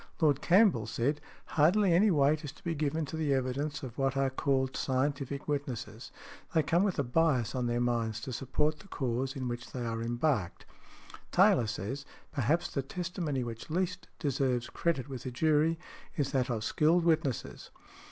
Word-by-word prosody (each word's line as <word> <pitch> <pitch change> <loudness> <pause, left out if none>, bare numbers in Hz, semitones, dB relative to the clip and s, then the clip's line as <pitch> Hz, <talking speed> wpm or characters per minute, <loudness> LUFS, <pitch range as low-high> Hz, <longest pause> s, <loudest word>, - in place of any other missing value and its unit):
Lord 150 -5 +3
Campbell 180 - +4
said, 125 +6 -1 0.2
"Hardly 175 +5 +3
any 200 +5 +5
weight 150 -1 +3
is 145 - -5
to 160 - -20
be 170 -3 -1
given 155 +1 -1
to 155 - -6
the 150 -3 +1
evidence 135 +3 -2
of 125 0 -7
what 135 0 +1
are 135 -1 +2
called 130 -1 0
scientific 140 +1 -1
witnesses: 140 -6 -4 0.4
they 160 - +4
come 170 +4 +2
with 200 -2 +1
a 140 - +2
bias 130 -3 +2
on 125 -2 -1
their 120 0 0
minds 115 -2 0
to 130 - -5
support 150 +5 -1
the 195 - -15
cause 130 -4 -2
in 130 -2 -3
which 120 0 -5
they 125 -2 -3
are 115 0 -2
embarked". 120 - -1 0.7
Taylor 120 -3 +5
says, 110 +8 -4 0.3
"Perhaps 150 +6 +1
the 140 - -1
testimony 165 -2 -3
which 115 +2 -7
least 180 +2 -2
deserves 130 -5 0
credit 160 -6 -1
with 130 -3 -7
a - - -1
jury 155 +5 +2 0.4
is 140 -3 0
that 130 -2 +1
of 115 -3 -1
skilled 160 +8 +3
witnesses. 155 -6 0
140 Hz, 175 wpm, -31 LUFS, 125-160 Hz, 0.7 s, any